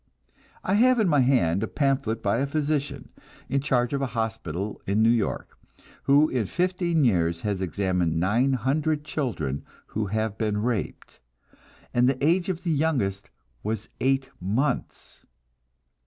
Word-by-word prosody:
I 190 - 0
have 255 0 +5
in 215 - +3
my 150 -4 +3
hand 120 -9 +3
a 110 - -1
pamphlet 130 -6 0
by 100 +2 +2
a 140 - 0
physician, 145 -2 -2 0.4
in 135 +1 +1
charge 125 -3 +1
of 140 - 0
a 135 - 0
hospital 105 -4 -3
in 105 +3 +2
New 115 - +5
York, 115 -3 -1 0.5
who 145 +2 +5
in 120 -8 -1
fifteen 175 - +1
years 85 -6 +1
has 100 -3 -2
examined 90 -2 0
nine 115 +10 +2
hundred 145 +5 0
children 80 - -2 0.2
who 110 -1 -3
have 110 +1 -2
been 105 -2 0
raped, 120 -4 -3 0.7
and 125 +1 +4
the 135 +1 0
age 175 +3 +2
of 180 -2 -3
the 170 - 0
youngest 135 -11 0 0.3
was 110 0 -3
eight 135 0 +1
months! 120 +9 -2
125 Hz, 150 wpm, -26 LUFS, 100-145 Hz, 0.7 s, have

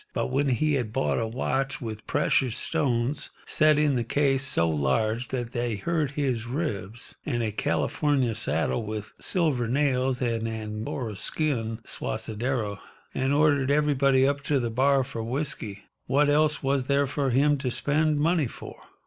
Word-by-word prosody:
But - - -2
when 140 +1 +1
he 150 +5 +1
had 120 -6 -1
bought 135 +2 0
a 115 - -1
watch 135 +4 -2
with 110 -5 -7
precious 130 -4 +1
stones 140 -3 -1 0.2
set 155 -1 +3
in 150 -2 +3
the 120 - 0
case 135 +2 +1
so 105 -11 +2
large 80 - 0
that 120 -3 -4
they 120 -2 -1
hurt 155 - -1
his 125 -6 -1
ribs, 120 - -4
and 120 -6 -1
a 110 - -1
California 130 +3 0
saddle 105 - 0
with 110 0 -6
silver 150 -10 +1
nails 130 -1 +1
and 115 -2 -1
Angora 110 +1 -4
skin 115 -1 -1
suaderos, 110 -1 -2 0.3
and 135 +1 0
ordered 145 -2 +3
everybody 140 -2 +3
up 140 0 0
to 145 -1 +2
the 120 -2 -2
bar 135 +3 +3
for 125 -3 -6
whisky—what 130 +2 -1
else 150 0 +2
was 135 -1 +1
there 140 +1 +2
for 140 0 -1
him 140 +3 +3
to 130 -2 -2
spend 150 +4 +1
money 160 -2 +2
for? - - -10
130 Hz, 155 wpm, -26 LUFS, 115-145 Hz, 0.3 s, set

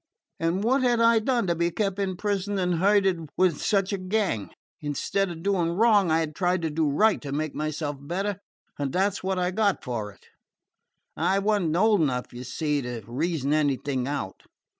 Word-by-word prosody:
And 165 +4 0
what 260 +4 +2
had 245 -2 +2
I 230 0 +5
done 235 0 0
to 175 - +1
be 170 +1 0
kept 195 +1 -2
in 190 -2 -1
prison 205 0 -1
and 180 -3 0
herded 190 -4 +2
with 180 -5 +2
such 195 -1 +1
a 200 - -2
gang? 185 - -1 0.3
Instead 155 +6 -1
of 165 -1 -8
doing 180 -4 +1
wrong, 205 -2 +4
I 160 +1 +3
had 155 -1 -3
tried 180 0 0
to 160 - -1
do 155 0 +1
right, 210 +9 +3
to 140 - -6
make 155 +1 -2
myself 150 -1 -3
better, 190 +7 -3 0.4
and 140 -2 -2
that 195 +2 +2
's 200 - -7
what 190 0 -1
I 180 0 0
got 200 0 +1
for 110 -5 -4
it. - - -23 0.9
I 195 - +1
was 205 +1 +2
n't 160 -2 0
old 210 0 +4
enough, 125 -5 -1
you 120 +1 -7
see, 145 +3 -1
to 120 -3 -5
reason 145 +3 -1
anything 140 -3 0
out. 140 -10 -4
175 Hz, 200 wpm, -26 LUFS, 145-200 Hz, 0.9 s, I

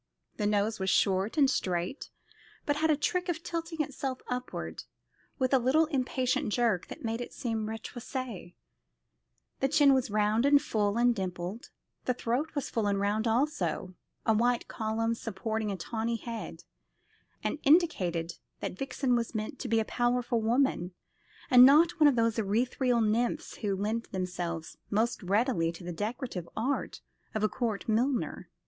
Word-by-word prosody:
The 210 - 0
nose 210 +1 +1
was 190 0 0
short 195 - +2
and 285 -2 +6
straight, 180 - -2 0.6
but 290 0 +1
had 320 +1 +2
a 305 - +4
trick 360 +4 -1
of 335 -1 -2
tilting 330 -2 -2
itself 265 -2 -4
upward 250 0 -5 0.5
with 260 0 0
a 265 - +6
little 265 +7 +3
impatient 260 -3 0
jerk 225 -6 +1
that - - -8
made 225 +1 -2
it 245 - -6
seem 225 -4 -2
retroussé; 225 -3 -6 1.0
the 270 - +2
chin 280 0 +5
was 260 -3 +1
round 210 +2 +2
and 285 +1 +6
full 210 -6 0
and 240 0 +4
dimpled; 185 +2 -5 0.4
the 250 - +1
throat 255 +7 -2
was 285 - -1
full 220 -3 -1
and 200 -1 +1
round 210 +3 0
also, 220 - 0 0.3
a 220 - +4
white 240 +2 +1
column 225 +1 -1
supporting 220 0 -3
the 200 - -1
tawny 225 +5 -2
head, 225 - -6 0.8
and 215 +8 -2
indicated 185 - +2 0.2
that 185 - -5
Vixen 270 -1 0
was 235 -1 -2
meant 215 +6 -4
to - - -4
be 225 -1 +2
a 220 - 0
powerful 240 0 0
woman, 220 -6 +1 0.6
and 250 -1 +10
not 320 +5 +6
one 305 - +7
of 285 - +4
those 230 -1 +2
ethereal 235 +3 +1
nymphs 225 +3 0
who 205 -3 -1
lend 215 +4 -2
themselves 175 -3 -4
most 225 +3 0
readily 200 -3 +1
to 170 +1 -11
the 175 0 -5
decorative 210 - -4
art 260 +6 -2 0.3
of 215 - 0
a - - +5
court 220 -2 -3
milliner. 240 +4 0
230 Hz, 160 wpm, -30 LUFS, 205-260 Hz, 1.0 s, and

